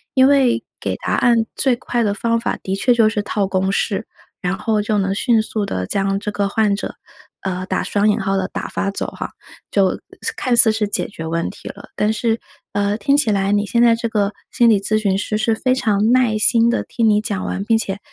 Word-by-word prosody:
因 260 0 +6
为 270 -4 +3 0.2
给 - - -2
答 - - -3
案 235 -2 +3
最 265 -2 +3
快 240 0 -1
的 205 -2 +1
方 230 +2 0
法 230 - -2
的 190 - -2
确 245 +5 +2
就 230 -2 +4
是 215 -1 -1
套 205 -1 -1
公 190 0 0
式， 200 +1 -1 0.4
然 185 -1 -1
后 215 -2 0
就 210 0 -1
能 195 -1 0
迅 230 +1 +2
速 215 -1 -3
地 90 - -3
将 195 - 0
这 210 - -4
个 200 -1 0
患 210 -1 +1
者， 200 - -5 0.5
呃， 185 -1 -3
打 - - -1
双 205 +1 +1
引 210 - +1
号 195 -1 -1
的 190 0 -1
打 - - -5
发 200 - -2
走 - - -3
哈， - - -6 0.4
就 195 -2 +2 0.4
看 250 -3 0
似 220 -2 +7
是 215 -2 -1
解 - - 0
决 165 -5 -8
问 165 +1 -2
题 - - -10
了。 - - -11
但 210 +1 +1
是， 225 +1 0 0.4
呃， 205 +1 0
听 280 +4 +2
起 285 -7 +2
来 195 0 +1
你 205 0 +1
现 235 +3 +1
在 235 -1 +5
这 230 0 -3
个 210 -2 0 0.2
心 240 -1 +4
理 210 -3 +3
咨 215 +2 +1
询 200 -3 +1
师 210 +1 -2
是 220 +1 +1
非 255 +3 +1
常 215 -3 +1
耐 245 -4 +3
心 230 +2 +4
地 240 - 0
听 230 -2 0
你 210 0 +3
讲 200 -3 -3
完， 195 - -3
并 225 +2 +2
且 200 -3 -3
210 Hz, 250 characters per minute, -19 LUFS, 200-230 Hz, 0.5 s, 似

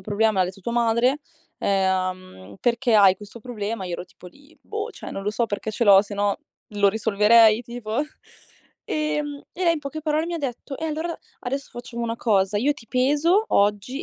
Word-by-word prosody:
problema, 215 +3 +1
me 190 - -2
l'ha - - +4
detto 190 +2 -9
tua 235 +5 -4
madre 240 +4 +2 0.4
uhm, 185 - -1
perché 235 -1 +1
hai 195 -3 +7
questo 210 +3 -12
problema?" 215 -3 -4
Io 180 - -5
ero 175 - -4
tipo 180 0 -16
lì: 285 - -18
"Boh, 435 +2 -5
cioè - - -9
non 195 - -5
lo 210 - -1
so 230 +2 0
perché 210 +1 -4
ce 235 +2 -1
l'ho, 200 -1 +8
sennò 205 -1 -1 0.3
lo 205 -1 +3
risolverei 220 +2 +4
tipo?" 235 -1 -5 0.9
Ehm, 300 -2 -2
e 370 - -3
lei 335 - +5
in - - -3
poche 290 +2 -6
parole 310 +1 0
mi 345 - -3
ha - - -2
detto: 270 0 -5
"E 320 - -5
allora 320 +2 -3 0.2
adesso 275 +3 -4
facciamo 240 -1 -7
una 230 0 -2
cosa, 200 -3 +1
io 285 +6 +2
ti 240 -5 -15
peso 295 +11 +2
oggi 210 - +1
230 Hz, 195 wpm, -23 LUFS, 200-280 Hz, 0.9 s, l'ho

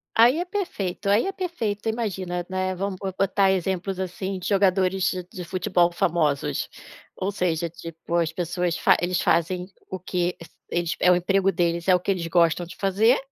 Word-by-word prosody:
Aí 240 +6 +6
é 355 - -1
perfeito, 200 - -3
aí 205 +3 +4
é - - -1
perfeito. 230 - -3
Imagina, 185 -6 -3
né, 185 0 -1
vamos 195 +1 -2
bo 195 -1 -3
botar 195 0 +3
exemplos, 190 0 -1
assim, 190 +1 -3
de - - -5
jogadores 190 -1 +2
de 185 -1 -3
de 180 - -6
futebol 175 -1 +1
famosos, 155 -4 0 0.5
ou 195 +2 -2
seja, 170 -3 -1
tipo, 165 +1 -6
as 165 -2 +2
pessoas 175 0 -1
fa - - +5
eles 175 0 0
fazem 180 +2 +1 0.2
o 185 - -4
que 180 0 -1 0.3
eles 170 -1 -1
é 180 - +5
o 180 - +6
emprego 195 +2 +2
deles 170 -1 0
é 185 - +6
o - - +2
que 190 - -1
eles 175 -3 -2
gostam 170 0 +3
de 170 - -11
fazer, 205 +6 +3
185 Hz, 185 wpm, -24 LUFS, 175-195 Hz, 0.5 s, Aí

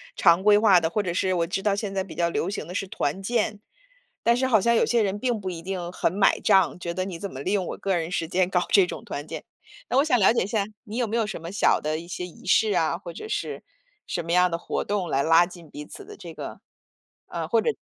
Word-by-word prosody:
常 170 0 +5
规 205 0 +6
化 205 -4 +6
的 160 -1 0
或 210 +3 -1
者 175 -2 -2
是 185 +1 0
我 170 -1 +1
知 185 +3 -3
道 200 -1 +1
现 205 -1 -4
在 190 -1 -1
比 185 - -11
较 170 -1 +1
流 170 - -1
行 200 - -4
的 180 - -7
是 195 0 -2
团 190 -3 -2
建， 215 -1 -1 0.6
但 235 0 +4
是 260 +1 +1
好 220 -5 +4
像 235 +4 +2
有 - - +4
些 235 -2 +2
人 200 +1 -1
并 245 -3 0
不 190 -2 -4
一 165 -1 -7
定 180 -1 -4
很 175 - 0
买 195 +1 +3
账， 190 -4 +3
觉 170 - -4
得 185 +2 -2
你 175 -4 -6
怎 200 - -5
么 135 - -7
利 185 - -2
用 195 -2 +1
我 - - -5
个 195 -1 -1
人 165 -1 -2
时 170 -3 -1
间 185 +2 +1
搞 180 -2 +1
这 195 -3 +6
种 - - -7
团 145 +2 -6
建。 - - -6 0.5
那 255 - +1
我 275 - +6
想 255 -6 +3
了 195 +3 +5
解 - - +1
一 190 - -4
下， 205 -2 0 0.2
你 220 +3 -6
有 245 - +1
没 225 +1 -3
有 225 -2 +1
什 - - -5
么 170 +2 -7
小 205 - +3
的 155 +1 -2
一 170 - -10
些 180 0 -5
仪 175 - -13
式 220 -2 +4
啊， 165 0 +1
或 170 -2 -9
者 435 - -8
是 - - -3 0.5
什 170 - -3
么 170 - -3
样 180 0 +4
的 170 - -2
活 - - -3
动 200 -3 -2
来 135 -4 +1
拉 165 +3 +5
近 175 -3 -13
彼 150 0 -8
此 - - -10
的 420 +1 -12
这 - - -9
个 - - -8 0.7
啊， - - -4
或 - - +3
者 - - +1
190 Hz, 305 characters per minute, -25 LUFS, 170-210 Hz, 0.7 s, 规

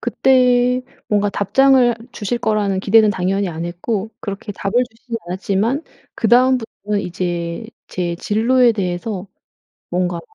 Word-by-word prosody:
그때 250 -1 +3 0.3
뭔가 205 -1 +2
답장을 245 +5 +4 0.2
주실 235 +3 -3
거라는 205 -4 0
기대는 215 +1 +5
당연히 195 +1 -1
안 165 0 -5
했고 195 +5 -3
그렇게 200 +1 -6
답을 195 0 -4 0.2
주시지는 230 +1 -7
않았지만 200 - -1 0.3
그다음부터는 235 -3 +2
이제 175 +2 -3 0.2
제 175 -2 -2
진로에 235 +5 +3
대해서 190 0 -3 0.6
뭔가 175 -1 -1
205 Hz, 295 characters per minute, -19 LUFS, 185-240 Hz, 0.6 s, 기대는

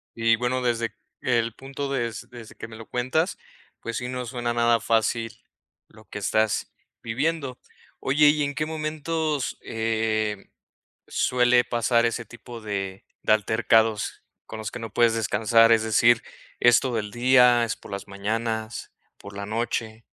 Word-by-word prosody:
Y 115 0 +3
bueno, 125 +2 -1
desde 115 -2 -1 0.3
el 115 -2 +1
punto 135 +1 -6
des 120 -6 -3
desde 120 -3 -11
que - - -8
me 115 - -11
lo 115 0 -11
cuentas, 130 +9 0 0.4
pues, 115 - -4
sí, 125 - -3
no 125 0 -4
suena 120 -1 -2
nada 120 0 +3
fácil 115 0 +1 0.6
lo 110 0 -18
que - - -7
estás 110 +2 0 0.3
viviendo. 135 +2 -2 0.4
Oye, 145 +2 +4
¿y 150 0 +2
en 145 0 -2
qué 155 +1 -1
momentos, 155 -1 -2
eh, 110 -2 -1 0.6
suele 125 0 +3
pasar 120 0 +2
ese 115 0 -1
tipo 120 0 -11
de 100 -2 -4 0.2
de 110 - +4
altercados 110 0 +2 0.2
con 110 - -7
los 110 - -5
que 120 - -7
no 115 -2 -7
puedes 120 -1 +4
descansar? 115 +1 +4
Es 110 -1 +5
decir, 115 +1 +4 0.4
¿es 120 -1 +6
todo 125 -4 -1
el 105 -1 -5
día, 125 0 +5
es 110 - -3
por - - -14
las 100 0 -5
mañanas, 110 +3 -3 0.3
por 100 0 -11
la 100 0 -5
noche? 110 0 -3
115 Hz, 160 wpm, -25 LUFS, 110-125 Hz, 0.6 s, es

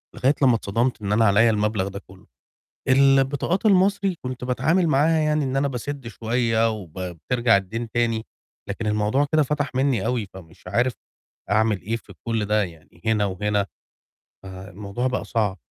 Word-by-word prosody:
لغاية 135 +4 +2
لمّا 125 -3 +5
اتصدمت 115 +3 -1
إن 100 -1 -3
أنا 110 +2 +4
عليَّ 110 +3 +5
المبلغ 105 -2 0
ده 100 0 -6
كلّه، 95 0 -16 0.6
البطاقات 135 +8 +3
المصري 195 -1 +3
كنت 125 -1 -5
باتعامل 145 +8 +1
معاها 155 +3 +3
يعني 150 -1 +1
إن 130 0 -2
أنا 140 +1 +2
باسِدّ 135 +1 -5
شوية 115 0 +1
وب 100 -7 -7
بترجع 95 +7 +1
الدَّين 110 +4 -4
تاني، 115 -1 0 0.4
لكن 110 +2 -4
الموضوع 105 +7 +1
كده 155 0 +5
فَتَح 145 0 -1
مني 130 -6 +1
أوي، 120 -3 -1
فمش 85 -2 -14
عارف 120 +7 +1 0.6
أعمل 110 -2 +2
إيه 110 +6 -2
في 115 - -13
كُلّ 115 -2 0
ده 105 +1 +2
يعني 85 -2 -10
هنا 110 -2 +2
وهنا. 100 +1 -1 0.8
ف - - -12
الموضوع 100 +5 -5
بقى 125 0 -1
صعب. 105 -5 -1
115 Hz, 165 wpm, -23 LUFS, 105-135 Hz, 0.8 s, لمّا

